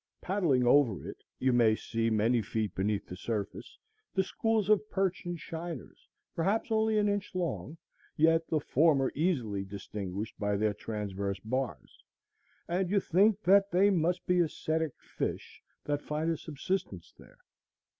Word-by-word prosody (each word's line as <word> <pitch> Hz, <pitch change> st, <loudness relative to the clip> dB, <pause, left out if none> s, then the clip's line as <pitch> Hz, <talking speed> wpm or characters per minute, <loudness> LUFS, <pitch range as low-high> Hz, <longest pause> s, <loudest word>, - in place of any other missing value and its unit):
Paddling 170 Hz, -10 st, +1 dB
over 120 Hz, -6 st, +3 dB
it, -, -, -9 dB
you 130 Hz, -1 st, +2 dB
may 115 Hz, -3 st, +5 dB
see, 115 Hz, +1 st, -1 dB
many 115 Hz, +2 st, +2 dB
feet 110 Hz, 0 st, -2 dB
beneath 100 Hz, +1 st, -1 dB
the 90 Hz, -, -8 dB
surface 105 Hz, +1 st, -5 dB, 0.4 s
the 190 Hz, -, +3 dB
schools 220 Hz, +1 st, 0 dB
of 215 Hz, 0 st, +3 dB
perch 190 Hz, -2 st, -1 dB
and 175 Hz, -1 st, -3 dB
shiners, 165 Hz, -5 st, -7 dB, 0.3 s
perhaps 200 Hz, +8 st, 0 dB
only 220 Hz, 0 st, +2 dB
an 210 Hz, 0 st, +3 dB
inch 205 Hz, -1 st, -2 dB
long, 155 Hz, -, -3 dB, 0.4 s
yet 165 Hz, +1 st, +4 dB
the 155 Hz, -, +1 dB
former 145 Hz, -2 st, +3 dB
easily 125 Hz, -, 0 dB
distinguished 100 Hz, +1 st, -6 dB
by 105 Hz, -1 st, 0 dB
their 105 Hz, 0 st, +1 dB
transverse 100 Hz, -2 st, -4 dB
bars, 115 Hz, -, -4 dB, 0.6 s
and 180 Hz, +1 st, 0 dB
you 200 Hz, +1 st, +3 dB
think 200 Hz, +4 st, +3 dB
that 200 Hz, +2 st, +5 dB
they 195 Hz, +3 st, +4 dB
must 175 Hz, 0 st, +1 dB
be 180 Hz, 0 st, +2 dB
ascetic 160 Hz, -2 st, 0 dB
fish -, -, -5 dB, 0.2 s
that 145 Hz, 0 st, -1 dB
find 155 Hz, +2 st, -1 dB
a 165 Hz, -, -1 dB
subsistence 145 Hz, -, -4 dB
there. -, -, -17 dB
150 Hz, 150 wpm, -30 LUFS, -, 0.6 s, may